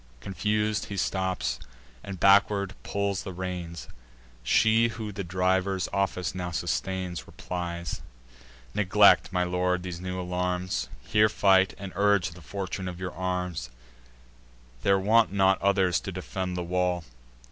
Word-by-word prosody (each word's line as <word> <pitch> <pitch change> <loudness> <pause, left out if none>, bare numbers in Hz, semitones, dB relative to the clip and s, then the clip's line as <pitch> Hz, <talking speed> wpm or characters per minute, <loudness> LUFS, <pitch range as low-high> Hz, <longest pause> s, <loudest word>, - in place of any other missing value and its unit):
Confus'd, 105 - -1
he 100 - -6
stops, 95 -9 -1 0.4
and 95 -2 -7
backward 100 0 +4
pulls 100 -1 -1
the 95 - -6
reins. 90 -2 -5 0.5
She 110 - +4
who 110 -2 -5
the 100 0 -5
driver's 95 +1 0
office 95 -4 -1
now 90 -1 -4
sustains, 90 +1 -3
Replies: 85 +1 -5 0.7
"Neglect, 105 0 +5
my 90 -1 +1
lord, 90 0 0
these 90 -2 -6
new 90 0 -4
alarms; 90 +1 -2
Here 105 0 +3
fight, 95 -2 +4
and 100 -1 -7
urge 100 -2 +3
the 90 +2 -13
fortune 95 +2 -5
of 90 -1 -6
your 90 -1 -4
arms: 90 -5 -3 1.1
There 100 0 +4
want 110 +3 +4
not 95 -1 +3
others 95 -3 +3
to 100 - -6
defend 90 0 -4
the 90 - -2
wall. 90 0 0
95 Hz, 135 wpm, -27 LUFS, 90-100 Hz, 1.1 s, Neglect